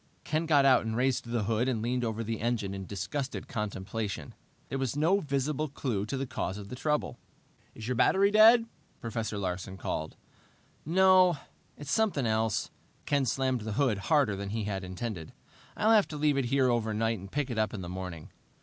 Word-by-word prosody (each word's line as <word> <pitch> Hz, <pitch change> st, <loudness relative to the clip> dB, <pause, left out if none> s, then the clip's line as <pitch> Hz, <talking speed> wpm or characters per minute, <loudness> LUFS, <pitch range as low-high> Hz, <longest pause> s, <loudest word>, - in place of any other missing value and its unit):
Ken 160 Hz, +2 st, -1 dB
got 145 Hz, -3 st, +5 dB
out 130 Hz, -2 st, +5 dB
and 110 Hz, 0 st, -3 dB
raised 130 Hz, 0 st, +1 dB
the 115 Hz, -2 st, -1 dB
hood 115 Hz, +4 st, +1 dB
and 120 Hz, -4 st, 0 dB
leaned 125 Hz, +1 st, 0 dB
over 115 Hz, 0 st, -2 dB
the 115 Hz, 0 st, -4 dB
engine 115 Hz, -4 st, -1 dB
in 95 Hz, -1 st, -6 dB
disgusted 130 Hz, +8 st, -4 dB
contemplation. 100 Hz, -, -4 dB, 0.3 s
There 135 Hz, -, -3 dB
was 135 Hz, -1 st, -1 dB
no 165 Hz, +7 st, +3 dB
visible 150 Hz, -1 st, -1 dB
clue 115 Hz, -7 st, -2 dB
to 135 Hz, -, -3 dB
the 135 Hz, -, -2 dB
cause 95 Hz, -6 st, -3 dB
of 100 Hz, -1 st, -9 dB
the 125 Hz, -, -6 dB
trouble. 150 Hz, +3 st, -1 dB, 0.6 s
"Is 110 Hz, -, -7 dB
your 125 Hz, -, 0 dB
battery 195 Hz, -, +4 dB
dead?" 225 Hz, +2 st, +7 dB, 0.3 s
Professor 115 Hz, -2 st, -3 dB
Larsen 95 Hz, 0 st, -4 dB
called. 80 Hz, -3 st, -4 dB, 0.7 s
"No. 185 Hz, 0 st, +5 dB, 0.4 s
It's 145 Hz, -1 st, -6 dB
something 205 Hz, -, +1 dB
else." 110 Hz, -1 st, 0 dB, 0.3 s
Ken 140 Hz, -2 st, +1 dB
slammed 130 Hz, -1 st, 0 dB
the 110 Hz, 0 st, -4 dB
hood 125 Hz, -5 st, +1 dB
harder 140 Hz, -4 st, +2 dB
than 100 Hz, 0 st, -5 dB
he 110 Hz, +1 st, -2 dB
had 100 Hz, -2 st, -3 dB
intended. 95 Hz, -2 st, -5 dB, 0.4 s
"I'll 220 Hz, -, +3 dB
have 215 Hz, -3 st, +5 dB
to 150 Hz, -, -6 dB
leave 150 Hz, -1 st, +2 dB
it 135 Hz, -2 st, +1 dB
here 130 Hz, 0 st, +2 dB
overnight 110 Hz, -1 st, 0 dB
and 95 Hz, +1 st, -10 dB
pick 145 Hz, -3 st, -1 dB
it 115 Hz, -, -2 dB
up 110 Hz, -, +1 dB
in 105 Hz, -, -6 dB
the 90 Hz, -, -6 dB
morning." 90 Hz, -3 st, -7 dB
120 Hz, 195 wpm, -29 LUFS, 105-145 Hz, 0.7 s, dead